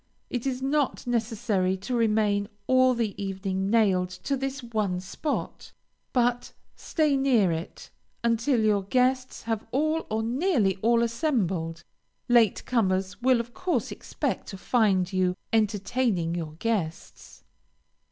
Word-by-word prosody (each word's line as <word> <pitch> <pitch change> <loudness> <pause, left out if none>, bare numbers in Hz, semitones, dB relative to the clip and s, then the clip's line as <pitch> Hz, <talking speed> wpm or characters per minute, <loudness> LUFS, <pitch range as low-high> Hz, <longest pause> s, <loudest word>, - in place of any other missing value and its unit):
It 245 +1 -2
is 260 -1 -2
not 285 0 0
necessary 220 -5 0
to 195 +7 -5
remain 210 -3 +2 0.2
all 255 -1 +4
the 225 -4 -1
evening 190 0 -2
nailed 195 -5 +3
to 185 +10 -3
this 270 0 -4
one 215 -6 -1
spot, 240 - -4 0.4
but 245 -1 0 0.2
stay 305 -4 +1
near 250 -9 +3
it 165 +1 -6 0.3
until 235 +2 +2
your 210 -2 +3
guests 255 +4 +1
have 225 -2 -2
all 310 +6 0
or 220 +1 -1
nearly 235 - +1
all 230 +3 +3
assembled. 190 - -1 0.4
Late 235 -4 +3
comers 190 -4 0
will 255 -1 +4
of 235 +1 -5
course 365 -1 -1
expect - - -3
to 195 - -7
find 195 -4 +1
you 185 -1 +1 0.2
entertaining 210 -4 +1
your 165 -3 -4
guests. 170 -3 -4
225 Hz, 130 wpm, -26 LUFS, 190-250 Hz, 0.4 s, all